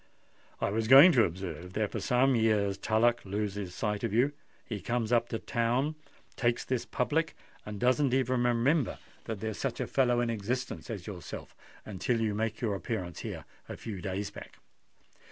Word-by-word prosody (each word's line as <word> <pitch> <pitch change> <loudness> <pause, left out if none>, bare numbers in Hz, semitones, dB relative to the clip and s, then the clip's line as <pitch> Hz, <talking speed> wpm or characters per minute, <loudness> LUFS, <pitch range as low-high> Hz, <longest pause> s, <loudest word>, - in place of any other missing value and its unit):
I - - 0
was 110 +1 0
going 135 +9 +10
to 120 -8 +5
observe 90 0 -6
that 105 0 -1
for 110 - -3
some 125 +6 +3
years 105 -3 +2
Tullock 120 +3 +2
loses 100 -2 -3
sight 105 -1 -2
of 115 - 0
you; 125 +7 +3 0.3
he 105 -4 -5
comes 115 +2 -1
up 120 -1 +3
to 115 - -2
town, 120 +7 0 0.4
takes 120 -2 0
this 125 -2 -2
public, 155 +6 0 0.3
and 105 -1 -5
doesn't 130 +3 +3
even 130 -1 +2
remember 125 +4 +2 0.3
that 110 -3 -5
there's 110 -1 -3
such - - -2
a - - 0
fellow 125 -3 +2
in 120 -1 +1
existence 120 +5 -3
as 100 -6 -5
yourself 95 -5 -8 0.3
until 110 +4 -1
you 110 -2 0
make 110 +1 -2
your 110 -4 0
appearance 95 -4 -4
here - - -6 0.2
a - - -6
few 100 -5 -6
days 100 +2 -3
back." - - -11
115 Hz, 175 wpm, -30 LUFS, 105-125 Hz, 0.4 s, going